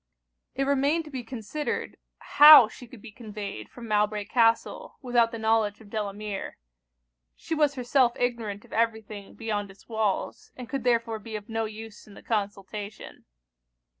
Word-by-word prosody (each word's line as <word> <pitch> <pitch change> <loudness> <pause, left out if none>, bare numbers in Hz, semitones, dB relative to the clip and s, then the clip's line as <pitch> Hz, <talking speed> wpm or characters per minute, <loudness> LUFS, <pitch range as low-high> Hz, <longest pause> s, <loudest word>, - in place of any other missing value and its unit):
It 275 - 0
remained 280 +4 +1
to 300 - -11
be 260 -2 -4
considered 245 +5 -4 0.2
how 295 -5 +9
she 245 +3 -12
could 225 -3 -14
be 235 - -10
conveyed 210 -3 -8
from 240 -2 -11
Mowbray 210 -1 0
Castle 230 0 +1
without 240 -2 +3
the 230 - -6
knowledge 220 -2 +1
of 210 -2 -16
Delamere. 210 -1 -5 0.8
She 325 - -6
was 300 -2 +2
herself 250 -1 +2
ignorant 230 -5 -3
of - - -15
every 225 -1 +1
thing 205 -1 -11
beyond 210 -3 -3
its 195 +1 -17
walls, 220 -4 -2
and 250 -2 -8
could 270 0 -4
therefore 230 -2 +1
be 220 +1 -8
of 210 +1 -7
no 225 0 -1
use 220 0 -10
in 205 - -14
the - - -14
consultation. 205 -1 -5
225 Hz, 165 wpm, -27 LUFS, 210-245 Hz, 0.8 s, how